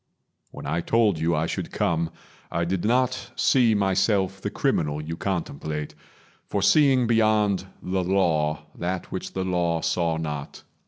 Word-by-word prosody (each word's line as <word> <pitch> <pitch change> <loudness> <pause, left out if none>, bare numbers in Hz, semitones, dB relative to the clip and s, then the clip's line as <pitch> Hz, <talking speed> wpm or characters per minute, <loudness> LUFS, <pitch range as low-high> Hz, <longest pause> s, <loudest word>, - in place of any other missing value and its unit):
When - - -10
I 80 +4 -1
told 105 -4 +2
you 85 +1 +1
I 75 +1 +1
should - - -4
come, 85 -1 0 0.4
I 85 +1 0
did 90 0 -1
not 130 +2 +1
see 120 -4 +4
myself 95 -1 +1
the - - -2
criminal 75 -1 0
You 80 +2 -5
contemplate, 80 -5 -3 0.5
for 100 - -1
seeing 135 0 +5
beyond 110 -4 +2 0.2
the 95 0 -1
Law 80 -5 +1
That 90 +1 -4
which - - -5
the 95 - -2
Law 85 -3 0
saw 85 -2 0
not. 75 -3 -5
90 Hz, 150 wpm, -25 LUFS, 80-105 Hz, 0.5 s, seeing